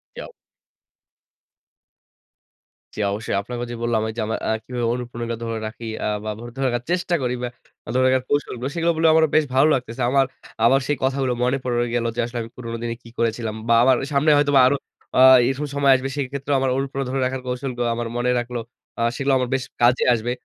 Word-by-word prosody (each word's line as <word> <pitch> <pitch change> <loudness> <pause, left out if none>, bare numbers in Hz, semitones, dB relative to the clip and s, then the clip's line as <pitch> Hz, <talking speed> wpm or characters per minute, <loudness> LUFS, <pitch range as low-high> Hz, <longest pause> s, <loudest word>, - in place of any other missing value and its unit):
জি - - -7
অও - - -13 2.7
জি, - - -5
অবশ্যই। 105 0 -2
আপনাকেও 120 +4 -5
যে - - -4
বললাম 120 -2 +1
ওইযে 110 +1 -4
আমার 110 - -2
আ - - +1
কিভাবে 120 -1 -3
অনুপ্রেরণা 120 -1 -4
ধরে 115 -1 -3
রাখি 115 +2 -8 0.2
আ - - 0 0.2
বা, 110 - -2
মুড 120 +1 -8
ধরে 135 - -2
রাখার 120 -1 -1
চেষ্টা 175 0 0
করি 125 0 0
বা, 125 - -1 0.5
ধরে 130 - +3
রাখার 130 0 +3
কৌশলগুলো 135 -3 -1
সেগুলো 170 0 +1
বলে 160 0 +4
আমারও 160 0 +4
বেশ 155 - +5
ভালো 135 +4 +5
লাগতেছে। 125 -1 -3
আমার 135 0 +4 0.4
আবার 135 +4 +5
সেই 145 - 0
কথাগুলো 130 -1 +1
মনে 125 +2 +2
পড়ে 120 -1 0
গেলো 115 -1 0
যে 120 - +1
আসলে 120 0 -6
আমি 115 - -9
পুরনো 115 -2 -5
দিনে 115 0 -2
কি 115 - -14
করেছিলাম 115 -1 -1
বা, 115 - +5
আমার 130 0 +5 0.2
সামনে 140 +3 +3
হয়তোবা 145 -2 +4
আরো 140 - +3 0.4
আ - - +5 0.3
এরকম 135 +3 -2
সময় 140 -1 +3
আসবে। 130 +1 -4
সেক্ষেত্রে 140 0 -3
আমার 135 -1 +1
অনুপ্রেরণা 135 0 -2
ধরে 135 0 -1
রাখার 130 +1 -3
কৌশলগুলো 125 -1 -3
আমার 120 0 -3
মনে 120 +1 +1
রাখলো। 120 0 -3 0.4
আ - - -4 0.2
সেগুলো 135 -1 0
আমার 125 -1 -1
বেশ 130 -1 -1 0.2
কাজে 120 +1 +4
আসবে। 115 +1 -2
125 Hz, 205 wpm, -22 LUFS, 120-135 Hz, 2.7 s, বেশ